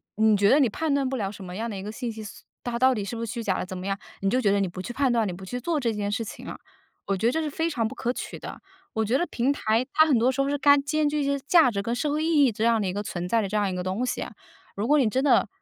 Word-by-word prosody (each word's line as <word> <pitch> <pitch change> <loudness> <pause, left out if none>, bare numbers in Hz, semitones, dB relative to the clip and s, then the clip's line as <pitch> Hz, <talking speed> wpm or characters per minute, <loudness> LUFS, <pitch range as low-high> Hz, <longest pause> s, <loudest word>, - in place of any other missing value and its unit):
你 220 0 +4
觉 200 +1 +4
得 285 - +5
你 265 -5 +4
判 310 +7 -1
断 275 -2 +1
不 265 - -2
了 200 -3 -2
什 200 - -10
么 180 -1 -8
样 225 +4 -3
的 210 - -5
一 190 - -5
个 210 - -6
信 235 +2 -4
息， 220 -1 -8 0.4
它 235 -1 -2
到 260 +1 +4
底 210 - -3
是 200 +4 -5
不 230 - -3
是 225 - -5
虚 235 -2 -4
假 - - 0
的 - - -3
怎 185 - -7
么 185 +1 -5
样， 195 0 -1 0.2
你 195 - +1
就 250 - +2
觉 210 -6 +2
得 200 - +2
你 195 - +1
不 180 +1 -7
去 240 - -6
判 270 -2 +1
断， 230 -3 +2
你 180 - -3
不 190 +2 -10
去 245 +6 -5
做 310 +4 -1
这 235 -3 0
件 205 -1 -2
事 230 +2 -1
情 220 - -9
啊。 - - -6 0.5
我 195 - 0
觉 190 - -2
得 235 - +4
这 320 - -1
是 310 - -2
非 325 +3 -1
常 230 -6 0
不 265 - -8
可 240 +1 -1
取 - - -6
的。 - - -9 0.3
我 220 - 0
觉 230 +5 +1
得 345 - 0
平 250 +3 0
台 225 -4 +1
它 315 - +6
很 280 -7 +3
多 245 +3 +3
时 270 +1 -1
候 275 - 0
是 290 - 0
该 285 0 +6
兼 295 +2 0
具 300 0 -1
一 - - 0
些 280 0 0
价 325 -7 +6
值 200 -3 -2
跟 230 +4 -2
社 290 +4 -1
会 305 +1 0
意 315 -3 +4
义 255 - +3
这 220 +1 -2
样 230 -1 +3
的 200 - -1
一 185 - -2
个 205 - -2
存 180 -3 -4
在 230 +4 +2
的 200 - -2
这 210 - -4
样 205 -1 +1
一 185 - -3
个 180 - -3
东 190 +7 -1
西。 - - -3 0.5
如 205 +3 -2
果 295 +2 +4
你 245 -5 +3
真 260 +5 0
的 285 - +4
235 Hz, 380 characters per minute, -26 LUFS, 205-275 Hz, 0.5 s, 它